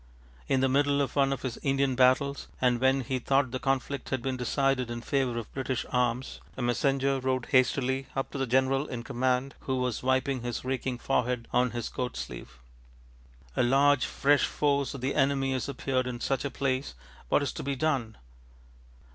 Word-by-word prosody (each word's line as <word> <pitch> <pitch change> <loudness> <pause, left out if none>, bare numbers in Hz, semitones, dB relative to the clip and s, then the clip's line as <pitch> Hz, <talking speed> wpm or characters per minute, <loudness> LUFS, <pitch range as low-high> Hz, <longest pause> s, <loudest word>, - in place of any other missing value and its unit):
In 130 - +2
the 135 - +4
middle 140 +1 +2
of 140 - -1
one 135 -1 +3
of 135 - -3
his 125 -3 -4
Indian 135 -1 +1
battles, 130 +2 +3
and 125 -1 +2
when 135 +1 +3
he 130 +1 -2
thought 135 0 +1
the 130 - -3
conflict 135 0 -1
had 130 -3 -2
been 130 -1 -1
decided 130 0 0
in 120 0 -4
favour 130 -2 0
of 115 - -6
British 130 -2 -2
arms, 125 0 -1 0.2
a - - -3
messenger 135 +2 +1
rode 130 -1 -1
hastily 130 0 +2
up 135 - -2
to 140 - -5
the 135 - 0
general 130 +3 +2
in 120 -1 -5
command, 125 +3 0
who 130 - -2
was 125 -3 -1
wiping 130 0 +1
his 120 +1 -4
reeking 130 -1 -2
forehead 125 -2 -1
on 125 +1 +3
his 120 -1 -4
coat 125 -1 -4
sleeve: - - -7 1.0
ŌĆ£A 120 - +2
large 140 +1 +4
fresh 145 0 +3
force 140 -2 0
of 135 - -7
the 135 +2 -1
enemy 135 -1 +2
has 130 0 -2
appeared 130 -1 -1
in 120 -1 -4
such 135 +1 -1
a - - 0
place; 130 - -2 0.3
what 145 - +3
is 140 - -1
to - - -5
be 140 0 -2
done? 130 -6 -1
130 Hz, 190 wpm, -28 LUFS, 125-135 Hz, 1.0 s, the